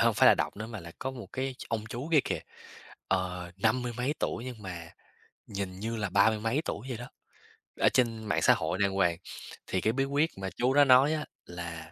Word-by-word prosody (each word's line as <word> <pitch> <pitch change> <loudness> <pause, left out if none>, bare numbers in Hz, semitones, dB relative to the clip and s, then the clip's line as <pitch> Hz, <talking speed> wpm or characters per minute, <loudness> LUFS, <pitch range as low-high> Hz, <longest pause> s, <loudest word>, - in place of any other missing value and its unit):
hông - - +4
phải - - +5
là - - +8
đọc - - -2
nữa 105 +2 -5
mà 110 -2 -7
là 85 -1 -10
có 130 - -2
một 120 -6 -8
cái 130 0 -2
ch - - -7
ông 110 -2 -2
chú 125 +7 -4
kia 155 - +7
kìa, - - -2 0.7
ờ, 90 -2 -1
năm 110 +5 +2
mươi 120 -1 -3
mấy 130 +4 0
tuổi 115 - -2
nhưng 120 -4 -7
mà 85 -3 -6 0.6
nhìn 95 -2 -4
như 115 +3 -3
là 105 -2 -1
ba 100 +3 +5
mươi 110 -1 -2
mấy 115 +8 0
tuổi 120 +6 -4
vậy 125 - -3
đó, 125 +2 -8 0.7
ở - - +6
trên 115 -3 +1
mạng 105 - +1
xã - - +7
hội - - -2
đàng 100 -1 +3
hoàng, 90 -3 +2 0.5
thì 95 - 0
cái 110 - +2
bí 135 +2 +1
quyết 145 +4 +1
mà 95 0 -3
chú 125 +2 +2
đó 145 - +7
nói 135 +3 +6
à 155 -1 -2 0.2
là, 85 -2 -7
110 Hz, 240 wpm, -30 LUFS, 95-130 Hz, 0.7 s, là